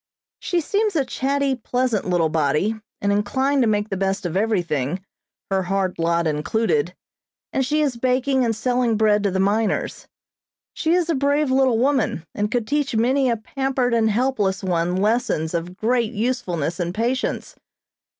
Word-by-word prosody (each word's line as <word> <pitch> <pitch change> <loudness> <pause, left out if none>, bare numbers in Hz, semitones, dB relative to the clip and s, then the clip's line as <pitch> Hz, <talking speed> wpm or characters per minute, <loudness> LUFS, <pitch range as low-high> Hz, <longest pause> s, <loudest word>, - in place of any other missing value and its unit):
She 350 -1 0
seems 415 +4 0
a 280 -4 +2
chatty, 275 +2 0
pleasant 245 -2 -1
little 170 -3 +2
body, 155 +6 +1 0.3
and 200 - +1
inclined 260 +7 +1
to 240 - +3
make 210 0 0
the 195 - -2
best 195 0 -1
of 175 0 -3
everything, 180 - -1 0.5
her 190 0 +2
hard 190 0 -1
lot 170 0 +1
included, 220 - 0 0.6
and 265 - +1
she 300 +4 +1
is 270 -5 -1
baking 255 +2 +1
and 230 -2 0
selling 245 0 +1
bread 210 -1 +3
to 200 - +1
the 190 0 -1
miners. 205 +2 0 0.7
She 325 +2 +1
is 355 -2 +1
a - - +2
brave 285 0 +1
little 260 -3 +3
woman, 255 - +1
and 210 0 -1
could 235 -1 -1
teach 285 0 -1
many 260 +4 +2
a 235 - +1
pampered 260 +2 -1
and 225 -1 +3
helpless 210 -5 0
one 175 -1 0
lessons 200 -6 0
of 175 +2 -4
great 235 +1 0
usefulness 185 - -2
and 175 +1 -2
patience. 240 +4 -2
225 Hz, 165 wpm, -22 LUFS, 190-260 Hz, 0.7 s, to